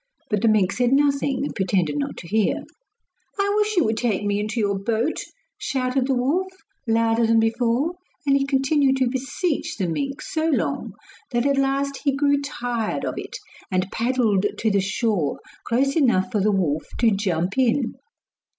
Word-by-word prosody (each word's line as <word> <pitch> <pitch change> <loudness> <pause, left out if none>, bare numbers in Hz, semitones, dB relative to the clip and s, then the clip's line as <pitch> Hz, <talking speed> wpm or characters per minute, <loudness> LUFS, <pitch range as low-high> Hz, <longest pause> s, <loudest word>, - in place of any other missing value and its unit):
But 210 -2 +1
the 230 - +3
mink 210 -4 +3
said 245 +2 +1
nothing 280 -1 +2
and - - -4
pretended 180 -5 0
not 145 -1 -3
to 170 - -9
hear. 215 +2 +1 0.8
'I 400 0 +2
wish 425 -1 +1
you 345 - +5
would 220 0 0
take 220 -4 0
me 205 0 0
into 215 +3 -2
your 200 -2 0
boat!' 230 +8 -1 0.4
shouted 255 0 0
the 270 - +2
wolf, 290 +10 +1 0.4
louder 225 0 +2
than 225 0 +4
before, 235 +6 +1 0.3
and 275 -1 +4
he 275 - +2
continued 270 0 +2
to 260 -1 +2
beseech 275 +5 -2
the 190 - 0
mink 275 - -3
so 315 0 -1
long 290 - -1 0.4
that 240 0 0
at 280 -1 +2
last 275 +1 0
he 280 -3 +2
grew 285 0 +2
tired 245 -5 -3
of - - -2
it, - - -6 0.3
and 185 +1 0
paddled 225 -5 +1
to 220 - +1
the 200 -1 +2
shore 195 - -1 0.3
close 270 +4 +1
enough 240 - +2
for 215 - +1
the 210 +2 +3
wolf 160 -6 0
to 230 -2 +4
jump 190 -3 -1
in. 250 0 +2
240 Hz, 180 wpm, -23 LUFS, 205-275 Hz, 0.8 s, you